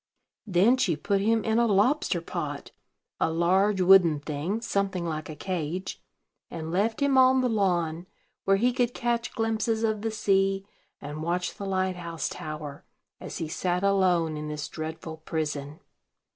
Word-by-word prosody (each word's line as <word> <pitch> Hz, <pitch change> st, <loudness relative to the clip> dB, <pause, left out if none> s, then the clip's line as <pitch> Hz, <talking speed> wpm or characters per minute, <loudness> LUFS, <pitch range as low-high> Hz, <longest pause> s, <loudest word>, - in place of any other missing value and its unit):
Then 200 Hz, +7 st, +4 dB
she 180 Hz, -10 st, +1 dB
put 195 Hz, +6 st, 0 dB
him 225 Hz, +1 st, +2 dB
in 225 Hz, +1 st, +2 dB
a 235 Hz, -, +3 dB
lobster 205 Hz, -, +2 dB
pot, 150 Hz, -4 st, -5 dB, 0.5 s
a -, -, +2 dB
large 185 Hz, +4 st, +2 dB
wooden 180 Hz, -5 st, +6 dB
thing, 150 Hz, +8 st, -3 dB
something 195 Hz, -5 st, -1 dB
like 155 Hz, -2 st, -4 dB
a 155 Hz, -, -6 dB
cage, 180 Hz, +1 st, -4 dB, 0.5 s
and 160 Hz, -1 st, -6 dB
left 215 Hz, +7 st, 0 dB
him 275 Hz, -2 st, +4 dB
on 260 Hz, 0 st, +5 dB
the 255 Hz, -, +2 dB
lawn, 175 Hz, -5 st, 0 dB, 0.4 s
where 195 Hz, 0 st, +3 dB
he 245 Hz, +4 st, +2 dB
could 245 Hz, -1 st, 0 dB
catch 235 Hz, -1 st, -1 dB
glimpses 225 Hz, 0 st, 0 dB
of 215 Hz, -2 st, 0 dB
the 225 Hz, -, -1 dB
sea, 195 Hz, -2 st, +1 dB, 0.3 s
and 150 Hz, +2 st, -7 dB
watch 175 Hz, +2 st, -1 dB
the 200 Hz, -, -6 dB
light 185 Hz, -1 st, 0 dB
house 170 Hz, -2 st, -4 dB
tower, 150 Hz, -2 st, -7 dB, 0.4 s
as -, -, -7 dB
he 160 Hz, -, -3 dB
sat 180 Hz, +3 st, -1 dB
alone 180 Hz, -5 st, +2 dB
in 150 Hz, 0 st, -5 dB
this 150 Hz, -1 st, -4 dB
dreadful 160 Hz, 0 st, -6 dB
prison. 150 Hz, -2 st, -4 dB
185 Hz, 160 wpm, -27 LUFS, 160-215 Hz, 0.5 s, wooden